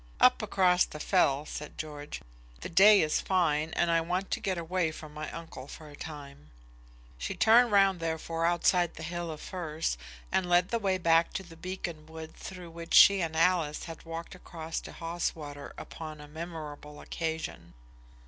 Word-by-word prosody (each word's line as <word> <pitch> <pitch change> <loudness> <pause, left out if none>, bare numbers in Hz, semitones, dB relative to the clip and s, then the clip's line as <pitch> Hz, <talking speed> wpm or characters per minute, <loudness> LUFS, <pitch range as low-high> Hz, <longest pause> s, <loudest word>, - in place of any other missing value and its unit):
"Up - - +6
across 180 -2 +3
the 150 - -7
fell," 150 -5 +2
said 150 -1 -7
George; 150 -1 -6 0.4
"the - - -5
day 200 +4 +7
is 155 - +1
fine, 160 -5 +1
and 170 - +2
I 165 0 +3
want 180 +3 -2
to - - 0
get 190 -2 -1
away 170 0 0
from 155 -1 -9
my 150 0 -5
uncle 165 -5 -8
for 155 +1 -10
a - - -11
time." 140 - -9 0.7
She - - -3
turned 235 +1 +6
round, 195 -2 +4
therefore, 165 0 -1
outside 175 0 +2
the 160 - -8
hill 175 +1 -4
of 155 -1 -6
firs, 160 - -3 0.3
and 180 -2 +1
led 175 +1 +4
the 235 - 0
way 195 -3 +1
back 165 -1 +3
to 190 - -3
the 170 -2 -13
beacon 170 -2 -6
wood 160 0 -9
through 180 -3 -9
which 165 0 -3
she 200 -1 +8
and 160 -1 -2
Alice 165 -2 +2
had 165 -2 -8
walked 165 0 -7
across 165 -3 -6
to - - -9
Haweswater 160 -4 -4
upon 155 -2 -8
a 150 - -10
memorable 150 -2 -8
occasion. 160 - -5
165 Hz, 175 wpm, -30 LUFS, 155-180 Hz, 0.7 s, she